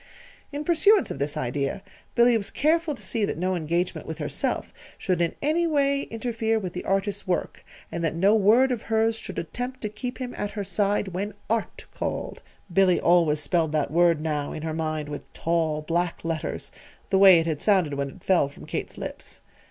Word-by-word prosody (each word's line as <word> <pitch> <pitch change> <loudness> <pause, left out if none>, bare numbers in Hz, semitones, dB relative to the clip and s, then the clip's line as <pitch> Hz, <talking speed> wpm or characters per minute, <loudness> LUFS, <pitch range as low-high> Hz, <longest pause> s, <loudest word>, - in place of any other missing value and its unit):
In 290 +1 -4
pursuance 380 +6 +4
of - - -5
this 145 +1 -1
idea, 140 +8 -2 0.3
Billy 240 0 +5
was 210 -3 -1
careful 315 0 +1
to - - -10
see 225 -3 -1
that 200 - -1
no 185 +2 0
engagement 170 +2 -2
with - - -5
herself - - -2 0.2
should 180 -2 0
in 170 - 0
any 330 +4 +2
way 280 -3 +2
interfere 225 -1 -1
with 185 -5 -4
the 180 - -5
artist's 195 +1 -1
work, 180 - -2 0.3
and 170 - -3
that 165 - 0
no 195 +5 +4
word 220 +5 +5
of 240 -3 -1
hers 225 0 +1
should - - -7
attempt 245 +9 -4
to 215 - -2
keep 230 +4 -6
him 250 -2 -5
at 205 0 -4
her 205 - -3
side 200 +1 0
when 195 +3 -4 0.2
ART 230 -1 -2
called. - - -4 0.3
(Billy 185 -1 +4
always 165 -4 +3
spelled 160 -1 +1
that 150 -2 0
word 170 -1 +4
now 150 -2 -2
in 155 - -6
her 160 -1 -2
mind 155 -1 -2
with 145 -1 -8
tall, 160 -2 0
black 170 +1 -1
letters 165 -1 -3 0.4
the 190 - +4
way 190 -3 +9
it 165 - -1
had 160 -3 -2
sounded 185 -8 +3
when 140 0 -2
it 185 +4 -15
fell 175 -7 +3
from 140 - -13
Kate's - - -5
lips.) - - -6
190 Hz, 200 wpm, -25 LUFS, 160-225 Hz, 0.4 s, way